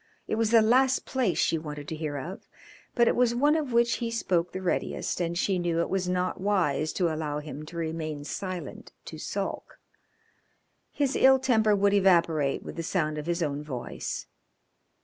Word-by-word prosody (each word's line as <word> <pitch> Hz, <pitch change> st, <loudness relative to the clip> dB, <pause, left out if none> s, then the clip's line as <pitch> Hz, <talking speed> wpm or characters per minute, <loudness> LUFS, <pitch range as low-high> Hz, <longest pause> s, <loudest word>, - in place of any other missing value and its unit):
It -, -, -3 dB
was 220 Hz, 0 st, +1 dB
the 225 Hz, -1 st, +6 dB
last 260 Hz, +4 st, +3 dB
place 250 Hz, -9 st, 0 dB
she 165 Hz, -, +2 dB
wanted 150 Hz, -2 st, -7 dB
to 160 Hz, -, -3 dB
hear 155 Hz, -2 st, -4 dB
of, 170 Hz, +8 st, -7 dB, 0.5 s
but 235 Hz, -1 st, +4 dB
it -, -, +3 dB
was 240 Hz, -1 st, +2 dB
one 290 Hz, +5 st, +3 dB
of 300 Hz, -5 st, -1 dB
which 235 Hz, 0 st, +3 dB
he 235 Hz, -2 st, -2 dB
spoke 180 Hz, -7 st, 0 dB
the 185 Hz, -, -5 dB
readiest, 180 Hz, 0 st, -2 dB
and 170 Hz, 0 st, -1 dB
she 185 Hz, 0 st, +1 dB
knew 170 Hz, -1 st, 0 dB
it 170 Hz, -, -1 dB
was 185 Hz, -1 st, 0 dB
not 180 Hz, 0 st, -1 dB
wise 180 Hz, -6 st, +1 dB
to 170 Hz, -4 st, +1 dB
allow 155 Hz, -2 st, -3 dB
him 150 Hz, 0 st, -7 dB
to 170 Hz, -, -9 dB
remain 160 Hz, -2 st, -3 dB
silent 185 Hz, +3 st, -6 dB
to -, -, -8 dB
sulk. -, -, -4 dB, 1.1 s
His 280 Hz, -2 st, 0 dB
ill 265 Hz, 0 st, +6 dB
temper 220 Hz, -5 st, +3 dB
would 200 Hz, 0 st, +3 dB
evaporate 170 Hz, -7 st, +3 dB
with -, -, -8 dB
the -, -, -1 dB
sound 155 Hz, -3 st, -1 dB
of 150 Hz, -, -7 dB
his 170 Hz, 0 st, 0 dB
own 145 Hz, -1 st, -2 dB
voice. 130 Hz, -5 st, -5 dB
180 Hz, 190 wpm, -27 LUFS, 155-225 Hz, 1.1 s, the